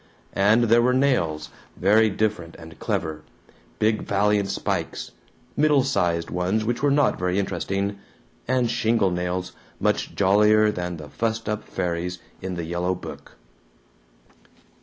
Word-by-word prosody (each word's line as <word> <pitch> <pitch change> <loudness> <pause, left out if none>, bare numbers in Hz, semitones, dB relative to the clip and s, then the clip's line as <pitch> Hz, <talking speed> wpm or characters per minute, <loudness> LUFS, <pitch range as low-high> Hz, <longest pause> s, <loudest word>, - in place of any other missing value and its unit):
And 105 +4 +4
there 115 +1 +5
were 125 +1 +3
nails, 80 - +1 0.3
very 110 +4 +4
different 100 -4 -2
and 80 0 -12
clever 80 -1 -2 0.6
big 110 0 +1
valiant 100 0 +1
spikes, - - -3 0.4
middle 145 -2 +4
sized 90 -9 0
ones 95 +5 0
which 120 +1 -1
were 145 - +3
not 140 -1 +2
very 90 +1 0
interesting, 100 +1 -2 0.5
and 125 -2 +1
shingle 115 -4 +2
nails 90 +1 -2 0.3
much - - 0
jollier 105 +2 +4
than 90 -3 -4
the 75 -1 -9
fussed 115 +6 -2
up 105 -1 -2
fairies 90 +1 -3 0.2
in 95 -1 -4
the 85 -1 -4
yellow 90 +2 -1
book. 90 - -10
100 Hz, 135 wpm, -24 LUFS, 90-110 Hz, 0.6 s, there